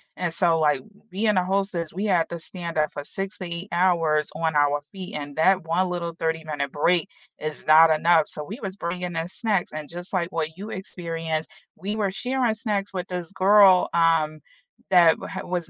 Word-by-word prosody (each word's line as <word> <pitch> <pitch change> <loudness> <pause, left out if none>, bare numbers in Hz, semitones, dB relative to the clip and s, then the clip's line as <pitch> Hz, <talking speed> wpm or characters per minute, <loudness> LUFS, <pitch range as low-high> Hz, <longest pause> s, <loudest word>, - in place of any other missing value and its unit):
And 175 -2 -2
so, 165 -1 +2
like, 150 -3 +2 0.3
being 210 +1 +1
a 180 - +2
hostess, 190 -4 -1
we 195 +4 -3
had 180 -5 +2
to 170 - -4
stand 170 0 -6
up 155 0 +1
for 145 - -6
6 195 +5 -5
to 185 - -5
8 170 +4 -6
hours 165 -4 +2
on 160 -1 -1
our 145 0 +3
feet, 190 0 -8
and 145 -1 -6
that 185 +2 +3
one 180 +3 +1
little 170 -1 -3
thirty-minute 155 -4 -2
break 165 +2 +1 0.3
is 155 0 -5
not 160 +1 +7
enough, 160 0 +4
so, 150 - -4
we 210 - -8
was 195 -1 -5
bringing 180 -1 -4
in 165 +1 -2
snacks, 200 -1 -1
and 155 -1 -6
just 175 +3 -7
like 180 0 -1
what 160 -1 -3
you 200 +4 -8
experienced, 165 -5 -4 0.3
we 205 +5 -4
were 205 -3 0
sharing 250 +2 0
snacks 205 -3 -3
with 180 -1 -4
this 180 -1 -5
girl, 195 -1 +5
um, 165 -2 +2 0.5
that 175 -3 +6
had - - -5
was 175 -3 -3
175 Hz, 195 wpm, -24 LUFS, 160-190 Hz, 0.5 s, not